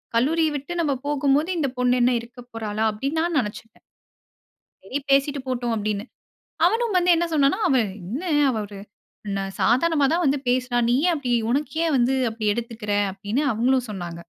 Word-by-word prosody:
கல்லூரிய 315 +6 +2
விட்டு 285 +6 -7
நம்ம 290 -4 +1
போகும்போது 290 +3 +1
இந்த 280 - +1
பொண்ணு 250 0 +3
என்ன 250 +1 +4
இருக்க 240 +2 -14
போறாளா? 220 -1 -3
அப்படின்னு 275 +9 -2
நான் 340 -3 0
நினைச்சுட்டேன். 225 0 -6 1.0
சரி 255 +9 -3
பேசீட்டு 275 +1 +2
போட்டும், 240 -2 -1
அப்படின்னு. 210 0 -2 0.6
அவனும் 450 +1 +1
வந்து 360 0 +2
என்ன 345 +1 +1
சொன்னான்னா, 290 +7 +3
"அவன் 245 -6 +3 0.2
என்ன 245 - -5 0.4
ஒரு 200 -1 -11 0.8
சாதாரணமா 290 +4 +3
தான் 350 +1 +1
வந்து 280 +1 +2
பேசுறா. 250 -1 0
நீ 245 - +3
ஏன் - - +2
அப்டி? 260 -5 -3 0.2
உனக்கு 275 +1 -1
ஏன் 310 -4 +1
வந்து 250 +2 +2 0.2
அப்டி 220 -1 -5
எடுத்துக்கற?" 230 -3 -4 0.2
அப்படின்னு 205 +9 -2
அவங்களும் 250 +1 +1
சொன்னாங்க. 175 -3 -6
255 Hz, 160 wpm, -23 LUFS, 225-290 Hz, 1.0 s, என்ன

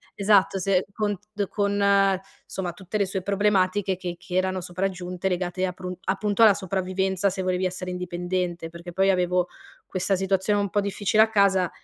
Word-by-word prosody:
esatto 200 -1 +3
se 185 0 +1
con 205 -1 -1 0.2
d 205 -1 -1
con, 200 -1 +2 0.3
somma, 180 -2 -4
tutte 190 +3 -5
le 200 - +2
sue 190 0 -3
problematiche 200 -1 +1
che 175 -2 -5
che 180 - -7
erano 185 0 +1
sopraggiunte 180 0 -3
legate 180 0 -1
aprun 180 0 -5
appunto 205 +3 0
alla 215 -2 +8
sopravvivenza, 190 +1 -1
se 190 0 -3
volevi 185 0 0
essere 180 0 -3
indipendente. 175 -1 -3
Perché 170 +1 -10
poi 195 +2 +3
avevo 180 -1 +1 0.4
questa 190 +1 0
situazione 190 +2 +1
un 200 -1 -1
po' 205 - +1
difficile 200 +1 +1
a 220 - 0
casa 195 -4 +3
190 Hz, 165 wpm, -25 LUFS, 180-200 Hz, 0.4 s, alla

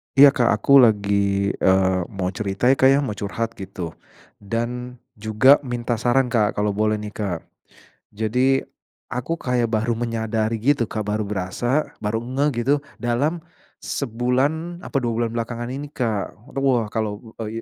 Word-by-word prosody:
Iya 140 +1 +9
Kak 120 -4 +1
aku 140 +6 +6
lagi, 100 -3 +3
eee, 95 0 +3
mau 95 -5 -3
cerita 100 +5 +1
ya - - +4
Kak 130 - +6
ya 135 +1 +5
mau 130 - -2
curhat 105 +3 -3
gitu 90 -3 -6 0.5
dan 120 +4 -4 0.2
juga 110 +6 +5
minta 120 -3 -3
saran 125 +1 +2
Kak 110 -3 +2
kalau 105 0 +1
boleh 110 +1 +1
nih 105 0 -6
Kak. 100 -6 -4 0.7
Jadi 125 +6 +1 0.6
aku 125 +7 -2
kayak 125 -5 0
baru 110 +1 0
menyadari 115 -1 -1
gitu 120 +1 +1
Kak, 110 -2 -3
baru 105 +1 -1
berasa, 105 +8 -1
baru 105 +1 -1
ngeh 135 +4 +1 0.2
gitu, 140 - +4 0.2
dalam 145 +8 -1 0.3
sebulan 140 +8 -1
apa 150 - -3
2 120 -3 0
bulan 115 - 0
belakangan 120 +1 -3
ini 140 +3 -5
Kak. 110 -6 -2 0.2
Te - - -11
wah 120 -5 +2
kalau, 105 -2 -3 0.2
eee, 115 +2 -5
115 Hz, 155 wpm, -22 LUFS, 105-125 Hz, 0.7 s, Iya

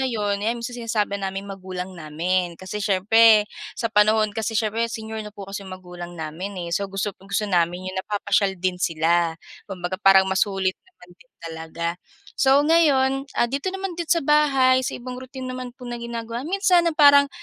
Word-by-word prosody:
na 265 - +1
yun 205 -4 -1
ayan, 230 +3 -1
minsan 245 +1 -6
sinasama 215 -3 -1
namin 195 0 -4
magulang 185 -1 -6
namin. 170 +2 -2
Kasi 200 +3 -5
siyempre, 210 +2 +5 0.3
sa 230 - -1
panahon 215 0 +3
kasi 225 +1 -2
siyempre 225 +2 0
senior 220 -1 -6
na - - -7
po 200 - -9
kasi 200 +1 -5
magulang 180 -2 -9
namin, 170 +5 -6
eh. - - -7
So, 200 +3 -1
gusto 195 +1 -3
gusto 195 +1 -3
namin 180 0 0
yung 185 - -7
napapasyal 200 -1 0
din 180 0 -2
sila. 165 0 +1 0.3
Kumbaga, 185 0 -5
parang 195 -1 +6
masulit 190 0 +1 0.2
naman 180 - -19
din 255 - -23
talaga. 165 0 -5 0.4
So, 275 +2 +4
ngayon, 275 -4 +3
ah, - - +3
dito 275 +8 -2
naman 385 -1 -4
din 340 -1 -5
sa 335 -5 +2
bahay, 270 -4 +4
sa 260 - -3
ibang 250 +1 -7
routine 260 0 -7
naman 255 -1 -7
po 250 - -12
na 240 -1 -6
ginagawa, 235 0 -5
minsan 365 -3 +3
na 315 - -4
parang 285 -1 +7
210 Hz, 180 wpm, -23 LUFS, 185-255 Hz, 0.4 s, parang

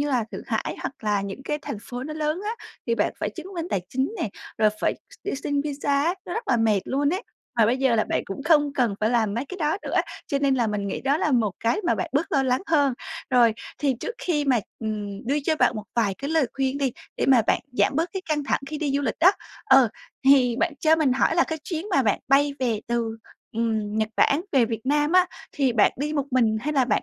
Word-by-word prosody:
như 290 - 0
là, 250 -4 +1
Thượng - - -6
Hải - - -2
hoặc - - -4
là 205 -2 +2
những 200 +7 -6
cái 295 +2 -2
thành 210 - -5
phố 245 +3 -6
nó 305 +2 -5
lớn 310 +2 -1
á, 425 - -1 0.4
thì 230 - +2
bạn - - 0
phải - - -1
chứng 335 0 -9
minh 335 -1 -3
tài 190 - +1
chính 265 - -1
nè, 220 - 0 0.3
rồi 215 -1 +4
phải - - +1 0.2
x - - -14
đi 400 - -2
xin 285 +1 -1
visa 285 -1 0
á, 340 +3 +1
nó - - -5
rất 455 - -4
là 245 - +4
mệt 220 -3 +3
luôn 285 +2 0
ấy, 380 - -3 0.3
mà 225 - +5
bây 240 +4 +2
giờ 265 -3 +3
là 220 - +2
bạn - - -1
cũng 195 +8 -6
không 295 -3 +3
cần 245 -7 +1
phải 215 +1 +2
làm 220 -4 +1
mấy 235 - -2
cái 370 +6 -8
đó 310 +2 +1
nữa, - - -3 0.3
cho 280 - 0
nên 275 -1 +2
là 240 -3 +1
mình 210 -2 -2
nghĩ 195 - -3
đó 275 +2 +2
là 310 - 0
một 230 -5 +3
cái 230 - +1
mà - - +3
bạn 335 - -3
bớt 310 +4 0
lo 275 -3 +3
lắng 255 -1 +1
hơn. 285 -5 +3 0.4
Rồi, 240 -3 +5 0.3
thì 280 -3 +1
trước 470 - -4
khi 300 -5 0
mà, 260 -4 +3 0.2
ừm, 215 0 -5
đưa 280 - +1
cho 315 +1 +2
bạn - - +3
một 215 - -5
vài 215 -5 +1
cái 280 +2 -4
lời 320 -4 +3
khuyên 270 0 -1
đi, 270 -3 0 0.2
để - - 0
mà 255 -4 +6
bạn - - +2
giảm 250 - +2
bớt 330 +3 0
cái 380 - -4
căng 300 -2 0
thẳng - - 0
khi 305 +1 -5
đi 290 -3 -1
du 285 - 0
lịch 235 - -2
đó, 360 - +8 0.3
ờ, 265 -2 +6 0.4
thì 260 -3 +5
bạn - - +1
cho 315 0 +5
mình 295 -5 +2
hỏi 290 +5 +2
là 345 - +5
cái 320 - -4
chuyến 335 +1 -4
mà 275 -8 +3
bạn 210 -4 +2
bay 285 +2 +4
về 235 -5 0
từ, 230 -1 -1 0.4
ừm, 220 -2 -1
Nhật 215 - +1
Bản 280 - +4
về 265 -4 +5
Việt 225 +1 -5
Nam 295 +3 +2
á, 365 0 +6 0.3
thì 270 -4 +1
bạn 215 -3 +4
đi 295 +3 -2
một 285 -2 -1
mình 235 -4 +3
hay 300 +6 -2
là 270 -4 +3
bạn - - +1
270 Hz, 265 wpm, -24 LUFS, 230-295 Hz, 0.4 s, đó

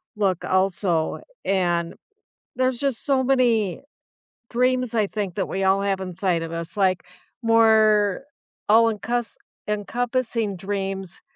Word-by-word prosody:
look 195 -4 0
also. 185 -3 0 0.2
And 175 -3 0 0.6
there's 255 -1 0
just 275 -4 -2
so 270 -2 +2
many 235 -7 +2 0.7
dreams 250 0 +1
I 215 -2 +2
think 200 -4 -4
that 195 - -1
we 195 - -2
all 190 +1 +3
have 195 -1 -1
inside 185 -1 -1
of 165 - -6
us, 165 0 -6
like 190 -3 +1 0.4
more 220 -2 +4 0.4
all-encus 225 +2 +2 0.3
encompassing 230 0 -1
dreams 195 -1 -4
205 Hz, 115 wpm, -23 LUFS, 190-230 Hz, 0.7 s, more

